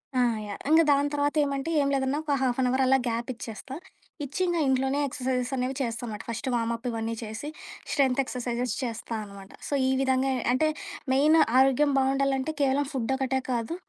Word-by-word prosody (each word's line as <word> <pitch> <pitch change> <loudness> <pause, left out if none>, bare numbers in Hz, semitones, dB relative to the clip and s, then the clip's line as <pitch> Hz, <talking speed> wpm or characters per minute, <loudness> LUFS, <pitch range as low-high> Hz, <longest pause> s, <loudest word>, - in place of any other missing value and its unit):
ఆ! - - +3 0.3
యాహ్! 205 - -6
ఇంగ 320 +1 +7
దాని 285 +1 +3
తర్వాత 290 +1 0
ఏమంటే 280 +2 -2
ఏం 280 - +1
లేదన్నా 270 +1 0
ఒక 300 -2 0
హాఫ్ 255 -1 +1
అన్ 255 - +2
అవర్ 260 +1 +2
అలా 265 +1 +5
గ్యాప్ 235 +1 -2
ఇచ్చేస్తా. 235 +3 -8 0.5
ఇచ్చి 285 +5 -6
ఇంగ 350 -1 0
ఇంట్లోనే 265 +1 +1
ఎక్సర్‌‌సైజెస్ 250 -1 -2
అనేవి 255 +1 -2
చేస్తానమాట. 230 -3 -4
ఫస్టు 230 +3 -3
వామప్పు 230 +1 -2
ఇవన్నీ 225 0 -3
చేసి, 220 +7 -6 0.4
స్ట్రెన్త్ 275 -2 +3
ఎక్సర్‌‌సైజెస్ 245 -2 -3
చేస్తా 230 -1 -4
అనమాట. 200 -1 -12 0.2
సో, - - -4 0.2
ఈ - - +2
విధంగా 265 0 +2 0.2
అంటే 310 +5 +2 0.4
మెయిన్ 300 +4 +5 0.2
ఆరోగ్యం 270 +2 +4
బావుండాలంటే 270 +2 +1
కేవలం 275 +1 +2
ఫుడ్ 260 0 -1
ఒకటే 265 0 0
కాదు, 235 +6 -2
265 Hz, 175 wpm, -27 LUFS, 240-275 Hz, 0.5 s, ఇంగ